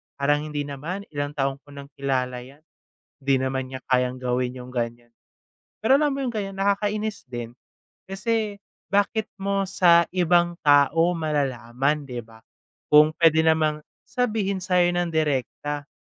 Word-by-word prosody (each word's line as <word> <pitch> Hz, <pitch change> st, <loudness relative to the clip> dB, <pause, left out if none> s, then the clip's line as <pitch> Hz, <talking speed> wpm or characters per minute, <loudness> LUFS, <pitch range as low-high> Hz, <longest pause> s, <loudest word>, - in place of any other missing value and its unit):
parang 145 Hz, +1 st, +2 dB
hindi 150 Hz, -1 st, -3 dB
naman, 150 Hz, +8 st, -5 dB
ilang 145 Hz, 0 st, -4 dB
taon 135 Hz, -1 st, -1 dB
ko 145 Hz, -, -50 dB
nang 140 Hz, 0 st, -10 dB
kilala 130 Hz, -2 st, -1 dB
'yan. 135 Hz, +5 st, -14 dB, 0.6 s
Di 135 Hz, -1 st, +3 dB
naman 130 Hz, 0 st, -2 dB
niya 130 Hz, -, -5 dB
kayang 125 Hz, -1 st, +1 dB
gawin 125 Hz, 0 st, -1 dB
yung 125 Hz, +1 st, -10 dB
ganiyan." 120 Hz, 0 st, -4 dB, 0.7 s
Pero, 220 Hz, +5 st, +3 dB
alam 295 Hz, +1 st, +3 dB
mo 275 Hz, -, -3 dB
yung 240 Hz, -, -3 dB
ganiyan, 195 Hz, -2 st, -4 dB
nakakainis 205 Hz, +1 st, 0 dB
din, 120 Hz, -1 st, -6 dB, 0.5 s
kasi 205 Hz, +1 st, -2 dB, 0.2 s
bakit 205 Hz, +2 st, +1 dB, 0.2 s
mo 195 Hz, 0 st, 0 dB
sa 175 Hz, -3 st, +5 dB
ibang 175 Hz, -1 st, +3 dB
tao 145 Hz, +3 st, +4 dB
malalaman, 140 Hz, -1 st, -1 dB
'di 125 Hz, -2 st, -5 dB
ba? 110 Hz, 0 st, -17 dB, 0.5 s
Kung 150 Hz, +1 st, +6 dB
puwede 160 Hz, -1 st, +5 dB
namang 155 Hz, -1 st, +2 dB, 0.2 s
sabihin 210 Hz, -7 st, -1 dB
sa 180 Hz, -1 st, +1 dB
'yo 175 Hz, 0 st, +3 dB
nang 175 Hz, -1 st, 0 dB
direkta, 145 Hz, -1 st, -2 dB
150 Hz, 150 wpm, -24 LUFS, 135-195 Hz, 0.7 s, Kung